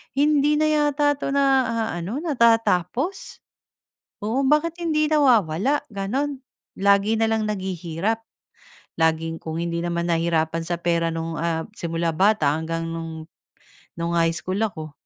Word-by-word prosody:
hindi 295 +1 +3
na 305 - +2
yata 295 -1 +2
'to - - -3
naaano, 260 - 0
natatapos," 235 - +1 0.8
oo, 245 +6 0
"Bakit 310 +4 +2
hindi 305 -1 +1
nawawala?" 250 - +3
Gano'n. 260 +8 -2 0.4
"Lagi 200 +2 +3
na 225 - +3
lang 220 0 0
naghihirap, 190 +2 -2 0.8
laging 160 0 +1
kung 160 0 -5
hindi 170 0 -2
naman 170 0 -2
nahirapan 165 -1 0
sa 175 +1 -3
pera 170 -1 0
no'ng, 165 -1 -4
ah, 165 -1 -1
simula 165 -3 -2
bata 185 -5 +3
hanggang 165 +1 -3
no'ng 165 -1 -6 0.7
no'ng 170 0 -2
high 165 -1 +2
school 185 +3 -3
ako, 160 -9 -3
190 Hz, 130 wpm, -23 LUFS, 165-270 Hz, 0.8 s, hindi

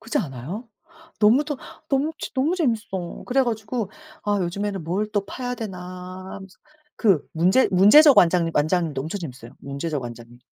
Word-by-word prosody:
그렇지 225 - -2
않아요? 160 - -5 0.5
너무도 270 +7 +3 0.3
너무 285 +3 +1
진 - - -6
너무 295 +7 +1
재밌어. 220 - -2
그래 265 +2 +3
가지고 220 -3 -3 0.3
아 205 0 +1
요즘에는 195 +1 -3
'뭘 190 +6 -1
또 205 -2 0
파야 250 +3 -4
되나?' 210 -6 -6 0.6
하면서. 190 -1 -11 0.4
그 195 - +3
문제 185 +10 +3
문제적 235 - +7
완장 170 -1 +4
완장도 155 -2 +1
엄청 165 +7 -5
재밌어요. 130 -6 -8
문제적 140 +1 -4
왕자님. 120 0 -9
195 Hz, 335 characters per minute, -23 LUFS, 165-240 Hz, 0.6 s, 문제적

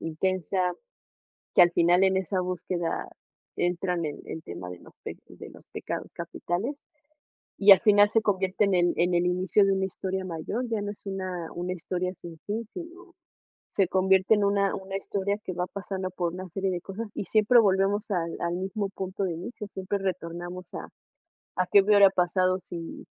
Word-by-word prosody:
intensa, 180 +2 0 0.8
que - - +8
al 175 0 +5
final 175 +3 +4
en 190 0 +3
esa 185 0 -1
búsqueda 180 -1 -3 0.5
entran 175 -1 0
en 150 - -4
el 160 - -6
tema 90 - -7
de 90 - -8
los - - -16
de - - -9
los - - -16
pecados - - -5
capitales. 230 - -4 0.7
Y 200 0 +9
al 190 - +7
final 205 -2 +6
se 225 - +3
convierte 190 0 +1
en 195 - +2 0.2
en 175 +1 +2
el 175 0 +3
inicio 185 +3 +3
de 195 - +3
una 190 0 +1
historia 190 0 -4
mayor, 185 +9 -3
ya 220 -3 -1
no 205 - -3
es 200 - -15
una 185 -3 -4
una 180 +1 -3
historia 180 +1 -3
sin 170 -2 -11
fin, 220 +2 -3
sino, 350 0 -10 0.6
se 195 -3 +2
convierte 190 +2 +4
en 205 - +1
una 200 0 +2
una 195 0 -4
historia 200 +1 -2
que 185 - -4
va 180 +1 -1
pasando 190 -1 -4
por 175 -2 -2
una 185 +1 -6
serie 195 +3 -1
de 175 -1 -3
cosas 210 +3 -6
y - - -3
siempre 215 +4 +5
volvemos 200 +1 +2
al 170 -3 -1
al 170 0 -1
mismo 195 +2 -2
punto 190 0 -4
de 180 - -1
inicio, 210 +5 -7
siempre 195 0 -3
retornamos 175 -1 -5
a - - -6 0.7
a 185 - +1
qué 200 - +7
hubiera 200 -1 +6
pasado 185 0 +2
si, 170 -2 -8
190 Hz, 180 wpm, -27 LUFS, 175-200 Hz, 0.8 s, Y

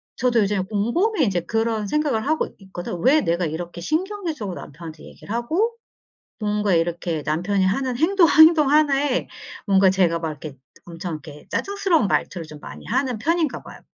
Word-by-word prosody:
저도 245 -2 +2
요즘에 200 -1 0
곰곰이 240 - 0
인제 185 -5 0
그런 225 +3 -1
생각을 285 -3 0
하고 315 +2 +1
있거든. 185 -2 -6
'왜 290 +4 +5
내가 170 - 0
이렇게 170 +2 -5
신경질적으로 320 - -3
남편한테 155 +1 -10
얘기를 210 - -9
하고' 345 - 0 0.6
뭔가 210 -2 0
이렇게 165 -1 -1
남편이 185 +5 0
하는 245 +6 0
행동, 340 +3 +4
행동 315 -2 +6
하나에 290 -3 +2 0.4
뭔가 195 -1 +5
제가 180 -3 +2
막 165 -1 -3
이렇게 150 -2 -8 0.3
엄청 175 +1 -6
이렇게 145 +1 -12
짜증스러운 390 - +1
말투를 170 -4 -1
좀 150 -1 -11
많이 - - -10
하는 255 0 -1
편인가 320 +3 0
봐요. - - -12
210 Hz, 385 characters per minute, -22 LUFS, -, 0.6 s, 행동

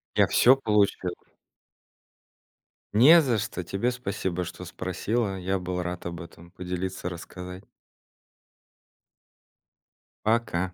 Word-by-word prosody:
Я - - +5
всё 130 +2 +6
получил. 105 -7 +1 1.8
Не 155 +10 +8
за 125 -6 +1
что. 105 -4 -4
Тебе 100 +8 -1
спасибо, 100 -7 -3
что 90 +1 -8
спросила. 95 +4 -2
Я 95 +1 -1
был 90 0 -3
рад 90 0 -5
об 85 0 -5
этом 85 0 -13
поделиться, 90 0 -4
рассказать. 90 +2 -9 2.6
Пока. 100 -5 0
95 Hz, 100 wpm, -26 LUFS, 90-110 Hz, 2.6 s, Не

